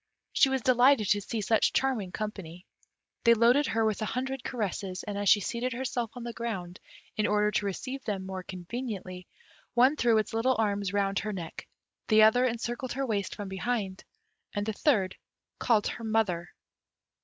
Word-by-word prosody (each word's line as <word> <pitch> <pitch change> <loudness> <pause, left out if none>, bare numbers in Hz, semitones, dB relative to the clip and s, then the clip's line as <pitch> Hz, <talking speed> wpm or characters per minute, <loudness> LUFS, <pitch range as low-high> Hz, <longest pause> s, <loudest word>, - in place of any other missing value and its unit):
She 270 - +5
was 265 -3 -1
delighted 250 -3 +4
to 205 0 +3
see 220 +2 -3
such 215 +2 +2
charming 245 -9 0
company. 190 -5 -6 0.6
They 235 0 +6
loaded 245 +6 +4
her 225 0 +1
with 215 -1 0
a - - 0
hundred 260 +3 -3
caresses, 195 -5 -3
and 205 -2 -5
as 200 -1 +1
she 205 - +6
seated 240 +5 -2
herself 245 -2 -2
on 245 - -7
the 235 0 -5
ground, 190 -7 -5 0.4
in 215 - +2
order 210 0 +2
to 210 - 0
receive 260 +7 -5
them 195 -3 -3
more 190 0 -5
conveniently, 185 -1 -6 0.5
one 255 +5 +5
threw 235 -6 +3
its 215 - -1
little 250 +3 +2
arms 205 -3 0
round 200 -1 +1
her 215 +1 -3
neck, 170 -4 -7 0.4
the 215 -1 +6
other 245 +4 +5
encircled 240 +1 -3
her 270 +2 -1
waist 205 -5 -2
from 205 -2 -6
behind, 190 0 -3 0.5
and 205 0 -1
the 220 - -2
third 200 -7 +1 0.4
called 220 -4 +2
her 230 - -4
"mother." 205 -6 0
215 Hz, 180 wpm, -29 LUFS, 195-240 Hz, 0.6 s, They